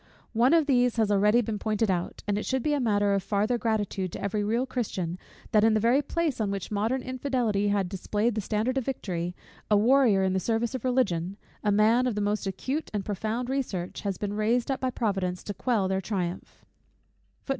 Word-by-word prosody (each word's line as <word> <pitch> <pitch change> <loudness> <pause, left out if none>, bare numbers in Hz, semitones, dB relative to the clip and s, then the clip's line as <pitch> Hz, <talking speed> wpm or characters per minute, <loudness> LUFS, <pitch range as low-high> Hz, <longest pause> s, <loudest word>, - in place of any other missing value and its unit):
One 245 +7 +4
of 325 -3 +4
these 250 -4 +3
has 220 -3 +2
been 205 - +3
already 210 +4 +4
pointed 215 -1 0
out: 175 -1 -3
and 205 - +1
it 210 - -2
should 265 -2 -1
be 300 -1 +1
matter 205 -4 +2
of 195 - +1
farther 215 +5 0
gratitude 205 -4 -1
to - - -5
every 205 +1 -1
real 230 +5 0
Christian, 190 -9 -3 0.3
that 210 -1 +4
in 220 0 +4
the - - +3
very 240 +6 +3
place 305 -3 -1
on 210 - 0
which 200 0 -4
modern 225 +5 0
infidelity 250 -6 0
had 200 -2 +1
displayed 205 +5 -1
the 215 - -2
standard 220 +6 0
of 255 - -6
victory, 180 -9 -3 0.3
a 210 - +5
warrior 230 -3 +4
in 190 -1 +1
the 190 - +1
service 225 +4 -1
of 260 - -4
Religion, 200 -8 0 0.3
a 210 - +2
man 225 +5 +4
of 240 - -1
the - - -1
most 205 0 -1
acute 260 - -2
discernment - - -16
and 200 -2 -2
profound 220 +4 -2
research, 205 -10 -3
has 200 -3 -2
been 205 -1 -3
raised 230 +5 +1
up 265 - -1
by 260 - 0
Providence 195 -7 -2
to 205 - -4
quell 210 -1 0
their 190 0 0
triumph. 180 -2 -4
215 Hz, 210 wpm, -27 LUFS, 200-245 Hz, 0.3 s, a